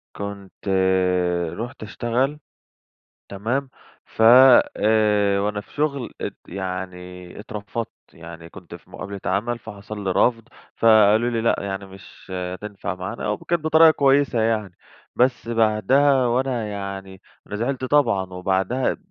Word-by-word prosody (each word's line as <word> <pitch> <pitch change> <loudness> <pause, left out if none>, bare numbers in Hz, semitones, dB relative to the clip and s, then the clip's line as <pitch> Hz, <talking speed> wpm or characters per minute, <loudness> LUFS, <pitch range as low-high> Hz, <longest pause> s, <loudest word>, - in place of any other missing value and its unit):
كنت 100 0 -8 0.9
رُحت 120 +1 -7
أشتغل، 125 +7 -2 0.9
تمام؟ 120 +8 -2 0.4
ف - - -6 0.6
آآ 105 -2 +2
وأنا 105 +1 -2
في - - -22
شغل 140 -4 -2
ات - - -5
يعني 90 -1 -7
اترفضت. 105 +1 -6 0.2
يعني 85 0 -11
كنت 85 -1 -12
في 85 - -17
مقابلة 100 +1 -7
عمل، 115 +6 -1
فحصل 105 -1 -9
لي 95 - -1
رَفْض، 115 +3 +1 0.3
فقالوا 110 +1 +5
لي: 115 -2 -1
"لأ 115 - +2
يعني 100 0 -5
مش 95 0 -15
هتنفع 95 +1 -5
معانا." 95 +6 -5
و 105 - -1
كانت 170 - -2
بطريقة 160 +1 +6
كويسة 140 -4 +2
يعني. 110 -5 -1 0.4
بس 125 -1 +1
بعدها 120 +5 +3
وأنا 120 -2 -1
يعني 100 -1 -7 0.3
أنا 105 - -5
زعلت 130 +4 -2
طبعًا، 115 -10 +1
وبعدها 95 +7 -1
105 Hz, 125 wpm, -22 LUFS, 95-120 Hz, 0.9 s, بطريقة